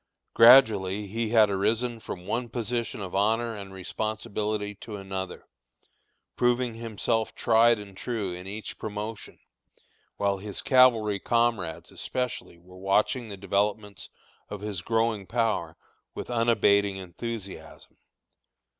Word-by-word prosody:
Gradually 105 -5 +6
he 110 +3 -3
had 110 -3 +5
arisen 115 +4 0
from 90 -4 -8
one 120 +4 -2
position 115 -1 -3
of 95 -2 -6
honor 110 +3 +1
and 100 -2 -8
responsibility 105 +1 -3
to 110 - -7
another, 95 -2 -6 0.9
proving 120 0 +1
himself 115 0 -2
tried 115 0 +4
and 100 -2 -10
true 105 -4 -3
in 90 +1 -8
each 105 +2 -7
promotion, 105 +1 -6 0.8
while 100 -1 0
his 100 0 -6
cavalry 115 -6 +4
comrades 115 -9 0
especially 125 -8 -4
were 90 +2 -16
watching 105 +5 +1
the 100 - -7
developments 100 +1 -2 0.4
of 105 - -6
his 105 -4 -4
growing 110 -2 0
power, 110 -7 -1 0.4
with - - -6
unabating 100 -4 +3
enthusiasm. 100 +2 -8
105 Hz, 120 wpm, -27 LUFS, 100-115 Hz, 0.9 s, Gradually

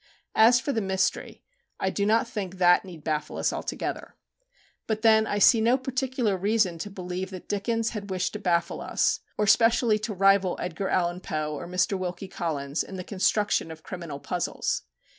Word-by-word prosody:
As 235 +3 +6
for 275 +3 -2
the 225 - 0
"mystery," 190 -1 -1 0.4
I 190 - 0
do 200 +1 0
not 230 +3 +3
think 200 -6 -5
that 180 -1 +5
need 175 -5 -11
baffle 150 -1 -2
us - - 0
altogether. - - -4 0.7
But 220 0 -2
then 220 -1 +5
I 205 - -1
see 220 +3 +6
no 235 +3 +4
particular 255 -4 -1
reason 195 -3 +1
to 205 - -5
believe 185 -1 -5
that 185 -2 -9
Dickens 225 +3 -1
had 205 -3 -6
wished 185 -1 -1
to 210 - -5
baffle 175 -4 0
us, - - +1 0.2
or 210 - +2
specially 225 +1 +4
to 215 0 -4
rival 195 -1 +3
Edgar 180 +2 -3
Allan 175 -1 0
Poe 155 -3 -3
or 150 +3 -6
Mr. 185 +2 0
Wilkie 180 +1 -4
Collins 145 -5 -2
in 195 - -9
the 185 - -5
construction 205 -2 +1
of 160 -1 -10
criminal 170 -6 -7
puzzles. 175 +4 -2
195 Hz, 180 wpm, -26 LUFS, 180-220 Hz, 0.7 s, As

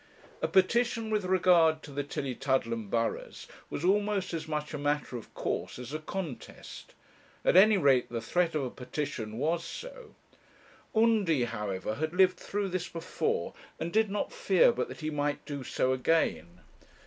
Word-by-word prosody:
A - - +1
petition 225 +3 +2
with 210 -3 0
regard 175 -4 +4
to 145 - -10
the 140 +1 -2
Tillietudlem 130 -5 -2
burghs 115 +1 -2 0.2
was 165 - -3
almost 200 -1 +1
as 160 -1 -4
much 150 -1 -3
a 150 - -3
matter 145 -2 -1
of 120 - -8
course - - -3
as 125 +3 -8
a 155 - -2
contest; 160 - -7 0.5
at - - +4
any 205 +3 +7
rate 135 -7 +3
the 120 - -3
threat 165 +8 0
of 150 - 0
a 125 - -3
petition 125 -4 -5
was 165 +5 0
so. - - -9 0.8
Undy, 215 - +3
however, 105 -4 -3
had 155 +7 -3
lived 185 -1 +5
through 205 -1 -2
this 180 -1 -3
before, 165 -1 -2 0.3
and 170 +1 -4
did 220 -1 +3
not 205 - -2
fear - - +4
but - - -2
that - - -10
he 155 0 -2
might 145 -1 -2
do 140 -2 -5
so 130 +1 0
again. 90 - 0
155 Hz, 165 wpm, -30 LUFS, 130-190 Hz, 0.8 s, any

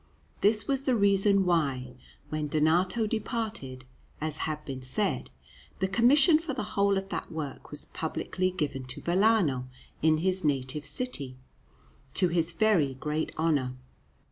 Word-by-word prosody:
This 210 +1 +3
was 275 -1 +1
the 260 -2 +1
reason 200 -1 +4
why, 135 -8 0 0.4
when 155 -1 -2
Donato 170 +9 +2
departed, 215 - -4 0.3
as 155 0 -2
has 155 - -1
been 135 -2 -5
said, 160 +11 -1 0.5
the 190 - 0
commission 275 - +5
for 320 -5 -4
the 255 - -2
whole 200 0 +3
of 195 0 -4
that - - -4
work 155 -4 -6
was - - -5
publicly 185 0 -2
given 150 -7 -3
to 125 +1 -8
Vellano 175 - +2 0.3
in 155 0 +4
his 185 +3 0
native 145 0 -1
city, 145 - -3 0.8
to 180 -2 +3
his 170 0 +1
very 170 -9 +2
great 150 +3 -2
honour. 145 -6 +1
170 Hz, 145 wpm, -29 LUFS, 145-210 Hz, 0.8 s, commission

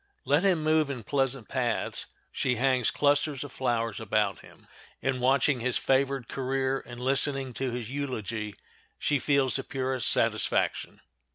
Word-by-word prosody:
Let 145 +3 +3
him 180 -5 +2
move 155 -1 +3
in 125 -5 -4
pleasant 135 -1 0
paths, 125 -3 -1 0.2
she 125 -1 0
hangs 130 -1 +2
clusters 145 -1 +1
of 145 - -8
flowers 115 -4 -1
about 105 -4 0
him. - - -16 0.3
In 130 -1 -1
watching 135 +1 +3
his 125 +1 0
favored 135 -2 +1
career 135 0 -1
and 120 0 -8
listening 135 0 0
to 130 +2 -2
his 120 -1 -5
eulogy 110 -7 -3 0.4
she 145 -2 +1
feels 140 -3 +2
the 135 - -4
purest 130 -2 -1
satisfaction. - - 0
130 Hz, 150 wpm, -28 LUFS, 120-140 Hz, 0.4 s, Let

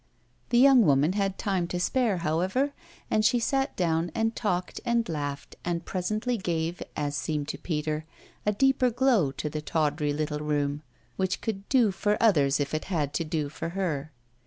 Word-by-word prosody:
The 240 - +3
young 260 -1 +7
woman 145 +2 +3
had 195 -1 -1
time 190 -4 0
to 180 - -3
spare, 220 +2 +1
however, 190 - +1 0.4
and 215 - +3
she 245 - +4
sat 270 +3 0
down 165 -1 +1
and 225 0 0
talked 180 -5 -2
and 235 -1 +1
laughed 145 -3 -4
and 170 -1 -2
presently 215 +6 -1
gave, 170 -1 -2
as 145 -1 -2
seemed 150 0 -2
to - - -4
Peter, 155 -1 -2 0.4
a 210 - +2
deeper 260 +3 +3
glow 240 - +2
to 150 - -4
the 150 0 -4
tawdry 150 -1 0
little 150 0 -2
room, 145 -1 -1 0.4
which 190 0 0
could 200 -3 -4
do 245 -6 +4
for 205 +2 0
others 150 -12 +4
if 145 +1 -2
it 155 - -2
had 150 -7 -1
to 155 - 0
do 155 -2 -2
for 160 +3 -5
her. 155 -6 -2
175 Hz, 180 wpm, -27 LUFS, 150-215 Hz, 0.4 s, young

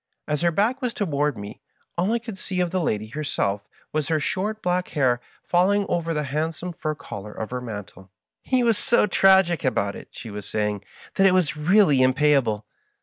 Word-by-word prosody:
As 150 0 -1
her 170 - +4
back 215 - +1
was 245 -2 -2
toward 150 - 0
me, 100 0 -8 0.3
all 180 +5 +1
I 235 - +2
could 225 -4 -8
see 185 -1 -3
of 175 -1 +1
the 185 -1 0
lady 110 -8 -1
herself 110 -8 -2 0.3
was 155 -2 0
her 160 -1 +1
short 210 +8 -2
black 180 0 0
hair 125 -3 +2 0.2
falling 195 +3 +2
over 170 -1 -1
the 150 -2 -1
hand 155 +4 -2
some 180 +2 -6
fur 155 -1 -3
collar 105 -7 -8
of 110 +1 -6
her 125 0 -3
mantle. 105 -5 -8 0.2
" - - -66
He 255 -1 +4
was 230 -4 +3
so 235 - +4
tragic 190 -4 +4
about 100 -6 0
it," - - -10
she 115 - -9
was 105 0 -7
saying, 105 -2 -1 0.2
" - - -20
that 195 - +6
it 185 - +4
was 175 -6 +2
really 155 -1 +4
mvpayahle. 130 -4 +3
155 Hz, 205 wpm, -24 LUFS, 120-185 Hz, 0.3 s, that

